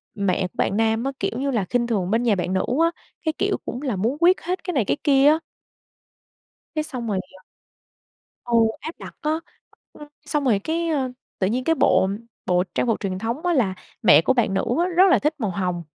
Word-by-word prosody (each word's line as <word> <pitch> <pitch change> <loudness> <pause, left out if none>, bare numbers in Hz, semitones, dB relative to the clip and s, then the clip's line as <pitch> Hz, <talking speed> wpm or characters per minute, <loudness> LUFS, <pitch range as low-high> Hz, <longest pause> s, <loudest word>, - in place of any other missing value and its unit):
mẹ 200 -2 0
của - - -26
bạn 195 - +1
nam 225 +1 +1
á, 270 - -1
kiểu - - -1
như 275 +1 -1
là, 220 -7 0
khinh 240 +5 0
thường 200 -5 -1
bên 230 +2 +2
nhà 230 -4 +3
bạn 185 0 -2
nữ 190 - +1 0.2
á, 335 - +3 0.3
cái 315 - +1
kiểu, 400 0 0
cũng 245 - -5
là 260 -7 -2
muốn 225 +9 -1
quyết 360 +2 +5
hết 365 +2 -3
cái 360 - -3
này 255 -8 +1
cái 140 - 0
kia 275 -1 +5
á. 310 +2 +5 1.4
Cái 310 - 0
xong 250 -6 -6
rồi, 200 -3 0 0.2
ờ 185 - -20 1.0
ừ, 240 - -4 0.3
áp 320 +3 -7
đặt - - -10
á. 310 +1 0 0.5
Ừm, 295 - -11 0.2
xong 295 0 -1
rồi 220 -6 +3
cái, 330 +9 -2
ơ, 270 -5 0 0.3
tự 190 - +2
nhiên 245 +5 -1
cái 325 +4 +2
bộ 190 - +3 0.4
bộ 180 0 +2
trang - - +1
phục 225 - +1
truyền 185 -2 -3
thống 235 - -3
á 350 - +2
là 230 - +2 0.3
mẹ - - +7
của 260 - +2
bạn 235 -6 +1
nữ 195 - +1 0.2
á 345 - +3
rất 365 - +7
là - - +5
thích 300 +2 +1
màu 215 -5 -1
hồng. 180 -2 -2
245 Hz, 230 wpm, -23 LUFS, 195-300 Hz, 1.4 s, mẹ